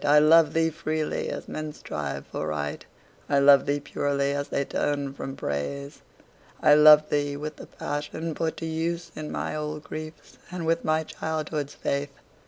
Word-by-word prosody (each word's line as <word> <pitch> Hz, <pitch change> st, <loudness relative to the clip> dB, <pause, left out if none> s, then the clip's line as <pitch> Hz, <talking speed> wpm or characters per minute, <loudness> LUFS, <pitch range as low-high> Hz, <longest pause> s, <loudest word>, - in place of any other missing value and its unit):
I 145 Hz, 0 st, +5 dB
love 155 Hz, 0 st, +6 dB
thee 165 Hz, 0 st, +3 dB
freely, 155 Hz, 0 st, -2 dB
as -, -, -5 dB
men 155 Hz, -1 st, -5 dB
strive 75 Hz, -, -5 dB
for 75 Hz, -, -4 dB
Right; 75 Hz, -1 st, -3 dB, 0.5 s
I 140 Hz, -, +3 dB
love 140 Hz, 0 st, +6 dB
thee 145 Hz, 0 st, +1 dB
purely, 140 Hz, -1 st, -1 dB
as 145 Hz, 0 st, -2 dB
they 140 Hz, -, -1 dB
turn 140 Hz, -1 st, -1 dB
from 135 Hz, 0 st, -6 dB
Praise. 140 Hz, -, -4 dB, 0.6 s
I 150 Hz, -, +6 dB
love 150 Hz, 0 st, +8 dB
thee 145 Hz, -1 st, 0 dB
with 150 Hz, +1 st, -6 dB
the -, -, -10 dB
passion 150 Hz, +3 st, -4 dB
put 160 Hz, +1 st, -2 dB
to 165 Hz, -, -5 dB
use 165 Hz, +1 st, -2 dB
In 155 Hz, -1 st, -6 dB
my -, -, -3 dB
old 150 Hz, 0 st, -4 dB
griefs, 155 Hz, 0 st, -9 dB
and 175 Hz, -2 st, -5 dB
with 165 Hz, +1 st, +1 dB
my 155 Hz, 0 st, +1 dB
childhood's 155 Hz, -2 st, -4 dB
faith. 140 Hz, 0 st, -2 dB
150 Hz, 175 wpm, -26 LUFS, 140-155 Hz, 0.6 s, love